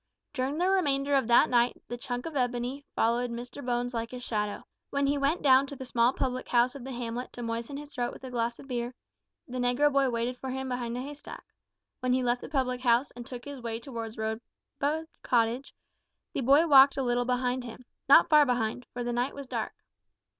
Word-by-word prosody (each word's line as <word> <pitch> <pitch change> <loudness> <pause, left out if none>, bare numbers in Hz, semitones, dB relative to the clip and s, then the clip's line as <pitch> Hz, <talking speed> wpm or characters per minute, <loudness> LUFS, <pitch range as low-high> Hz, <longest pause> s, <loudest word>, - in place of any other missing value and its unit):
During 270 +1 -1
the 355 +2 +2
remainder 285 -7 +1
of 270 -4 +3
that 240 0 +6
night 240 0 +2
the 240 - -4
"chunk 245 0 -5
of 325 -2 -6
ebony" 250 +1 -1
followed 240 +2 +1
Mr 240 +4 -7
Bones 245 0 -1
like 230 -1 -2
his 250 0 -8
shadow. 210 -3 -2 0.3
When 280 0 0
he 280 +1 +2
went 285 +4 0
down 270 0 +6
to 280 - -7
the 260 - -7
small 240 -1 +3
public 255 -1 -2
house 245 +1 +3
of 280 -3 -9
the 265 - -6
hamlet 240 0 -4
to 245 - -7
moisten 230 +4 -4
his 295 0 -9
throat 245 -1 -1
with - - -13
a 260 - -7
glass 235 -1 -1
of - - -13
beer, 245 -1 -3 0.5
the 255 0 -5
negro 250 +4 +2
boy 275 -1 +3
waited 240 +1 -2
for 265 - -5
him 265 0 -3
behind 245 -1 -3
a - - -3
hay 285 +2 -6
stack; 290 - -10 0.6
when 255 0 +1
he 255 0 +2
left 245 0 +1
the - - -8
public 255 -3 -1
house, 245 +2 +3
and 240 0 -10
took 250 -2 -8
his 285 -3 -7
way 230 -1 -4
towards 230 -3 -7
Rosebud 240 +7 -3 0.2
Cottage, 240 +2 0 0.6
the - - -1
boy 280 +6 +5
walked 275 -3 +7
a 270 - 0
little 245 0 +1
behind 250 0 0
him 245 +1 -10 0.2
not - - +8
far 300 -1 +7
behind, 245 -2 -1
for 245 - -3
the 240 0 -2
night 245 +3 -1
was 280 0 -7
dark. 235 -4 -3
250 Hz, 220 wpm, -29 LUFS, 240-275 Hz, 0.6 s, not